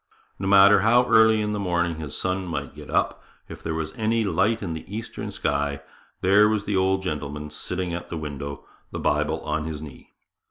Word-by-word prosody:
No 95 - -2
matter 100 +1 +7
how 120 +4 +4
early 110 -1 +5
in 105 0 -1
the 105 - -2
morning 85 -3 0
his 75 -3 -5
son 95 0 -2
might 85 - -4
get - - -11
up, - - 0 0.3
if - - -10
there 80 0 -3
was 80 -1 -3
any 110 +1 +1
light 105 +4 +1
in 85 -4 -3
the 80 - -6
eastern 110 0 -5
sky, 70 -7 -1 0.4
there 100 +3 +5
was 105 -1 -1
the 100 - -1
old 95 0 +2
gentleman 75 -3 -4
sitting 90 +3 -4
at 90 - -5
the 85 - -4
window, 70 -2 -6 0.2
the - - -6
Bible - - 0
on 75 0 -2
his 80 -2 -4
knee. 75 -3 -11
95 Hz, 200 wpm, -24 LUFS, 80-105 Hz, 0.4 s, matter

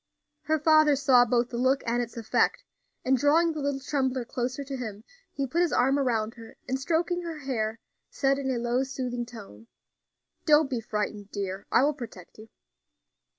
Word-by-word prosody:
Her 315 +1 +2
father 310 -1 +5
saw 260 -3 +5
both 240 0 +1
the 235 - -4
look 260 +2 +2
and 240 +1 +1
its 235 0 -6
effect, 230 - +1 0.4
and 265 +1 +4
drawing 310 +6 +3
the 310 - -5
little 280 -1 -1
trembler 265 -3 -1
closer 250 +4 -3
to 275 0 -6
him, 220 -5 -6 0.3
he 275 - -2
put 325 +7 0
his 345 -3 +2
arm 270 +2 +3
around 230 -4 0
her, 230 -2 -13
and 260 +1 -1
stroking 345 +5 0
her 335 -2 -5
hair, 225 -5 -2 0.3
said 275 0 +1
in 270 -1 -2
a 255 - 0
low, 240 +2 0
soothing 250 -3 -4
tone: 195 - -12 0.8
"Don't 300 -2 +5
be 245 -3 -1
frightened, 210 -1 -3
daughter; 195 -1 -4
I 250 - +5
will 295 +2 +3
protect 225 - -10
you." 220 +1 -12
260 Hz, 185 wpm, -27 LUFS, 235-285 Hz, 0.8 s, father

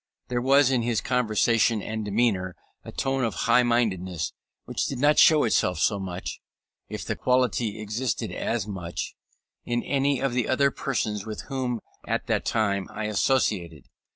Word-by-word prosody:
There 120 -1 0
was 135 +1 +5
in 125 -2 +2
his 115 -1 0
conversation 115 -2 +2
and 110 0 -4
demeanour 100 -4 0 0.3
a - - -9
tone 135 -1 -1
of 115 - -1
high 120 +2 +5
mindedness 95 -9 0 0.3
which - - -2
did 135 - -4
not 145 +4 +4
show 155 -2 +7
itself 90 -6 +2
so 100 +5 +1
much, 95 -2 -5 0.5
if - - -5
the - - -2
quality 125 -4 +1
existed 110 +2 -2
as 115 -4 -2
much, 90 -4 -5 0.5
in 120 0 -1
any 140 -1 +1
of 135 -2 0
the 125 -2 0
other 140 +1 +3
persons 110 -8 -2
with 110 - -5
whom 125 -4 -2 0.3
at - - -1
that - - 0
time 100 -4 0
I 105 +1 -5
associated. 100 - 0
115 Hz, 160 wpm, -26 LUFS, 100-130 Hz, 0.5 s, show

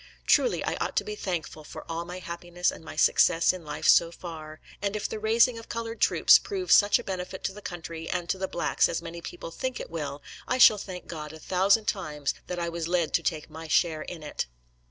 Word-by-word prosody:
Truly, - - +3
I - - -2
ought - - -2
to - - +3
be 425 - -5
thankful 165 - -4
for - - -10
all 165 +1 -4
my 180 +1 -7
happiness 175 0 -2
and - - -11
my 160 - -9
success 170 +1 +4
in 185 -2 -8
life 150 -1 -3
so 170 0 +6
far; 155 -3 -9 0.2
and 200 0 -1
if 210 - -2
the 220 - -5
raising 230 +2 +3
of 225 - -13
colored 230 0 -5
troops - - +6
prove 380 -3 -4
such 205 0 +7
a 240 - -7
benefit 185 -3 -5
to 190 - -2
the 210 - -11
country 165 -3 -7
and 175 -1 -2
to 190 - -1
the 190 - -1
blacks 175 - +1
as 165 - -3
many 170 0 -7
people 165 - -8
think 260 +7 -4
it - - -8
will, 145 -3 -5 0.2
I 255 - +1
shall 215 -4 +8
thank 185 -2 -7
God 155 -2 -7
a 160 - -10
thousand 195 +6 +2
times 150 -9 -2
that 180 - -4
I 170 -1 -2
was 170 -1 -3
led 175 -2 0
to - - +3
take 155 -3 -2
my 160 +1 -9
share 155 0 +2
in 165 0 -8
it. 150 - -4
175 Hz, 235 wpm, -27 LUFS, 160-200 Hz, 0.2 s, shall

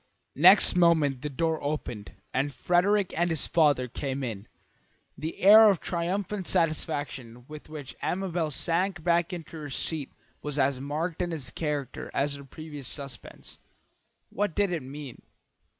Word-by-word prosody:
Next 185 +3 +8
moment 160 -7 +3
the 150 - -3
door 160 +3 -1
opened, 140 -8 -4 0.2
and 135 +2 0
Frederick 185 +6 +1
and 175 +1 +1
his 160 -3 +1
father 145 -6 +3
came 135 +2 -4
in. 110 -5 -5 0.7
The 160 +2 -5
air 215 +3 +9
of 195 -5 +2
triumphant 185 +3 -3
satisfaction 145 -7 -2
with 155 0 -11
which 150 -3 -8
Amabel 180 -4 -1
sank 170 +4 -1
back 170 0 +2
into 170 -2 -7
her 150 -2 -7
seat 145 +1 -4 0.3
was 150 -1 -4
as 135 -1 +2
marked 155 +5 -3
in 175 -1 -1
its 140 -6 -5
character 145 -4 -4
as 140 +1 +1
her 140 0 -8
previous 145 -1 -8
suspense. 135 -6 -7 0.7
What 205 -4 -1
did 200 -2 +1
it 170 - -2
mean? 135 0 -9
155 Hz, 150 wpm, -27 LUFS, 140-175 Hz, 0.7 s, air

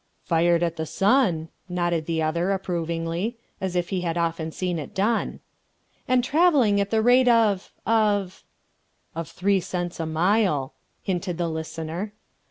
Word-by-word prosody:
"Fired 170 0 +2
at 170 -1 -1
the 160 0 -3
sun," 195 - +2 0.2
nodded 175 -3 -1
the 165 -1 0
other, 170 +4 0
approvingly, 170 +3 -2 0.2
as 190 -1 -2
if 175 -1 0
he 190 -2 -1
had 170 -1 -2
often 165 -1 -1
seen 180 0 -2
it 150 - -8
done. 220 +4 0 0.7
"And 255 -1 +3
travelling 275 - +4
at 200 - -2
the 220 0 +2
rate 250 +2 +5
of... 220 -5 +3
of...." 205 -4 +1 0.7
"Of 165 -1 -5
three 195 +1 +1
cents 175 -1 -4
a 165 - -2
mile," 160 -4 +1 0.3
hinted 180 -2 -2
the 170 -1 -1
listener. 160 +5 -5
180 Hz, 150 wpm, -24 LUFS, 165-205 Hz, 0.7 s, rate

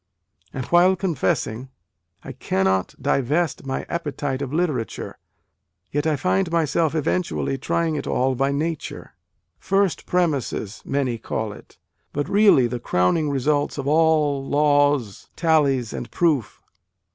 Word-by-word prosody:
And, 130 -2 -5
while 180 +2 +4
confessing, 135 - -1 0.3
" 85 -1 -43
I - - -6
cannot 95 -1 0
divest 140 +2 0
my 135 - -3
appetite 145 -5 -3
of 135 -2 -4
literature, 150 - -2 0.7
yet 145 +2 0
I 155 - +2
find 185 +5 0
myself 165 -1 +1
eventually 155 -3 -1
trying 165 +2 0
it - - -5
all 130 +1 +1
by 135 +2 0
Nature 155 +2 -4 0.5
first 195 -2 0
premises 145 - -1
many 130 -4 -1
call 110 -1 -3
it, - - -16 0.4
but 145 0 -2
really 200 - +5
the 120 +1 -3
crowning 115 - +1
results 145 +2 0
of 140 -1 -4
all, 150 -2 +3
laws, 145 -6 +1
tallies 140 -8 +2
and - - -6
proofs 155 - 0
145 Hz, 130 wpm, -23 LUFS, 130-165 Hz, 0.7 s, really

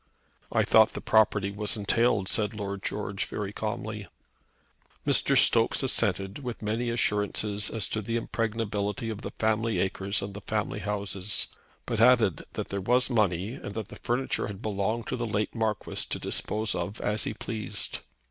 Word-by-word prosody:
"I - - +3
thought - - +5
the - - -4
property 105 -2 +3
was 105 +1 -1
entailed," 105 -1 +2
said 105 +1 +1
Lord 100 -2 -4
George 105 -1 -2
very 100 -1 -4
calmly. 105 -1 -4 1.0
Mr. - - +4
Stokes - - +4
assented, 95 +3 +1
with 125 -5 -6
many 115 +3 -1
assurances 105 -2 +2
as 110 -3 -1
to 110 - -1
the 115 +3 -3
impregnability 110 -2 -2
of 110 0 -6
the - - -4
family 110 +1 +1
acres 95 +2 0
and 100 0 -5
the 100 - -8
family 105 +1 -2
houses; 100 -1 -1 0.4
but 115 -3 -2
added 115 - +5
that - - -4
there 100 0 -2
was 125 +6 +3
money, 100 -2 +1
and 100 - -7
that 110 -3 -4
the - - -9
furniture 125 +3 -1
had 100 -2 -7
belonged 110 +2 -1
to - - -2
the 120 -1 -2
late 105 0 -1
Marquis 110 -3 -1
to - - 0
dispose 110 0 -1
of 90 +4 -4
as 105 +1 +1
he - - -3
pleased. 110 -2 -4
105 Hz, 165 wpm, -28 LUFS, 100-115 Hz, 1.0 s, thought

